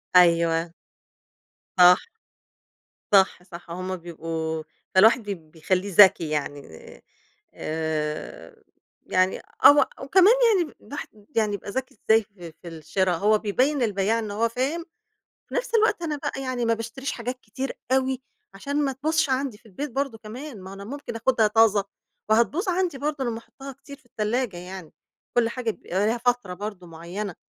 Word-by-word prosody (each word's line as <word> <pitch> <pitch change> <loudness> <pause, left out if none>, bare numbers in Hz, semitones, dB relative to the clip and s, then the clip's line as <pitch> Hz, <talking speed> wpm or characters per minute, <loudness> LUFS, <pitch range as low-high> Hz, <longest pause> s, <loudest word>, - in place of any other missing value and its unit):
أيوه. 170 -1 +4 1.0
صح. 180 0 +8 1.1
صح، 190 -2 +4
صح 175 -1 -12
هم 185 +2 -4
بيبقوا 160 -2 -4 0.3
فالواحد 220 +5 +6
ب 165 -6 -6
بيخليه 185 +4 -1
ذكي 185 -5 +7
يعني، 145 -1 -3 0.9
آآ، 155 -1 -4 0.4
يعني 185 +1 +1 0.3
أو 290 - +10 0.3
وكمان 375 - +6 0.3
يعني 335 -4 -2
الواحد 285 - -7 0.3
يعني 215 -2 +2
يبقى 200 - -6
ذكي 260 0 -4
إزاي 220 0 +6
في 180 -5 -12
في 175 - -11
الشرا، 170 +3 -1
هو 210 +5 +3
بيبيّن 255 +8 +1
البياع 210 0 +1
إن 215 -2 -4
هو 230 +3 +1
فاهم، 275 +8 -2 0.6
في - - -9
نفس 485 - -2
الوقت 425 -4 +3
أنا 310 -3 -2
بقى 270 -1 -4
يعني 255 -2 -2
ما 230 0 +3
باشتريش 230 +4 -5
حاجات 250 +2 -5
كتير 260 +5 -5 0.2
أوي، 265 0 +1 0.3
عشان 285 +8 -1
ما 270 - 0
تبوظش 310 +2 0
عندي 260 -4 -1
في 230 - -24
البيت 265 +8 -6
برضه 270 -2 -2
كمان، 235 +2 -9
ما 185 - -10
أهو - - -8
أنا 200 0 -9
ممكن 265 0 -7
أخدها 230 -1 +2
طازة، 210 -2 +4 0.5
وهتبوظ 260 - +2
عندي 360 -5 0
برضه 290 0 -2
لمّا 235 -2 -2
أحطها 270 +4 -11
كتير 280 +1 -13
في 260 - -29
التلاجة 220 -1 -2
يعني، 180 -1 -9 0.4
كل 240 -1 +3
حاجة 235 -1 -2
بيبقى 200 -1 -2
ليها 230 +2 +1
فترة 240 -6 0
برضه 200 -1 -7
معيّنة، 175 +4 -6
220 Hz, 155 wpm, -25 LUFS, 180-265 Hz, 1.1 s, أو